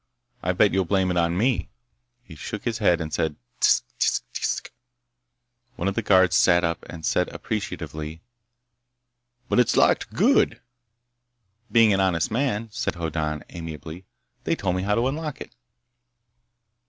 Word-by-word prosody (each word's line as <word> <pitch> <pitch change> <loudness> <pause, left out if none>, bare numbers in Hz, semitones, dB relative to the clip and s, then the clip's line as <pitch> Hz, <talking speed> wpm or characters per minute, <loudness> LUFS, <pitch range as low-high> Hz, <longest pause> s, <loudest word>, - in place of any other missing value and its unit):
I 90 - 0
bet 100 +3 +3
you'll 95 -1 +2
blame 95 0 +1
it 90 - -1
on 85 0 +1
me!" 125 +4 +1 0.5
He 90 - -13
shook 105 +6 -6
his 115 -1 -2
head 90 -6 +3
and 80 -1 -5
said 80 -2 0 0.2
"Tsk. - - +4 0.2
Tsk. - - +1
Tsk." - - -2 1.0
One 90 - -2
of 100 - 0
the 115 - -1
guards 95 -3 +4
sat 85 -1 +4
up 85 0 -1
and 80 -2 -7
said - - +1
appreciatively: 80 +1 -5 1.2
"But - - +2
it's 125 - +3
locked. - - +3
Good." - - +3 1.1
"Being 115 -3 +5
an 95 - +1
honest 90 -2 +1
man," 115 -2 -1
said - - -2
Hoddan 80 -3 -3
amiably, 80 +1 -8 0.4
"they - - 0
told 90 -2 -1
me 90 - -1
how 105 +2 +1
to 120 +3 +1
unlock 150 +1 -4
it." - - -9
95 Hz, 155 wpm, -24 LUFS, 85-105 Hz, 1.2 s, Being